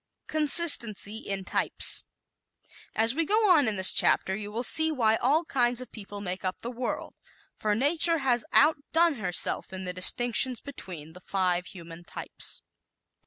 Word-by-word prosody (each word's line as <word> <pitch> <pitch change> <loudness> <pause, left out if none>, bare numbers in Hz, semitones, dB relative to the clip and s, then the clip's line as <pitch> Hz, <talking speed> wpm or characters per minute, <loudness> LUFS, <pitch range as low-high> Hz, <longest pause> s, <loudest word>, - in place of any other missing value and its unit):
Consistency 285 - +3
in 195 -3 -5
Types - - 0 0.6
¶ - - -22 0.2
As 225 +2 +2
we 330 +4 -1
go 425 +6 +1
on 295 -8 +3
in 215 - -2
this 190 -1 +4
chapter 190 - 0
you 205 0 -8
will 230 +3 -4
see 315 +6 +5
why 225 -7 +1
all 300 +7 0
kinds 245 -4 0
of 255 - -8
people 205 -2 -9
make 185 -1 -6
up 185 0 -5
the 240 - -6
world, 245 0 -6 0.4
for 210 -1 -2
Nature 320 +7 +2
has 250 -5 0
outdone 315 +1 +2
herself 180 -3 0
in 190 0 -8
the 180 -1 -6
distinctions 240 +6 +3
between 170 - -10
the 180 - -15
five 180 -2 -2
human 170 -2 -12
types. - - -7
230 Hz, 165 wpm, -26 LUFS, 190-285 Hz, 0.6 s, see